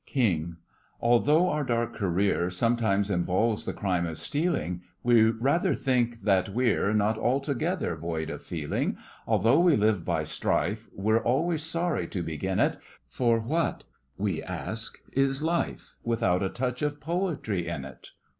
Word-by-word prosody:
KING: 85 - 0 0.4
Although 145 +9 +4
our 150 -2 0
dark 120 -2 -1
career 95 -2 +1
Sometimes 100 0 +1
involves 95 +5 +1
the - - -2
crime 90 -4 -1
of 80 - -5
stealing, 145 - -1 0.2
We 115 -2 +5
rather 130 +9 +1
think 120 -3 0
that 95 -2 +2
we're 110 -2 +1
Not 110 +1 +1
altogether 140 - 0
void 80 -1 -3
of - - -6
feeling. 80 -4 -2 0.3
Although 115 - +4
we 175 -3 +5
live 105 -4 +2
by - - 0
strife, - - -1
We're 110 +3 +2
always 150 +8 +1
sorry 165 +2 -1
to 90 -4 -3
begin 80 +4 -2
it, - - +2 0.3
For 120 -2 +1
what, 160 +9 -1 0.3
we 95 -4 -1
ask, - - -4 0.2
is 135 +1 +1
life 170 +1 -2
Without 115 -6 +1
a 95 - 0
touch 125 +2 -3
of 145 0 -1
Poetry 150 - -2
in 80 -6 -4
it? 65 - -12
115 Hz, 145 wpm, -27 LUFS, 95-135 Hz, 0.4 s, We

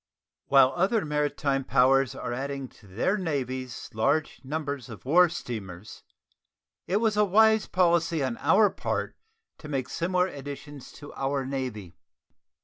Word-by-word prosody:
While 135 -1 +5
other 195 +3 +1
maritime 145 -2 -1
powers 135 -1 +3
are 120 - -4
adding 135 +1 -4
to 105 - -20
their 120 - 0
navies 130 -6 -4
large 140 +8 0
numbers 140 -3 -4
of 110 -3 -11
war 175 +6 +5
steamers, 105 - -7 0.9
it 190 - +1
was 215 -1 +1
a 210 - +5
wise 220 +2 +4
policy 170 -4 +2
on 125 -3 -2
our 210 -3 +4
part - - -3 0.4
to 150 - -10
make 135 -3 -2
similar 180 +1 0
additions 145 -3 -8
to 145 - -11
our 135 0 -2
Navy. 125 -10 -5
140 Hz, 140 wpm, -27 LUFS, 130-170 Hz, 0.9 s, While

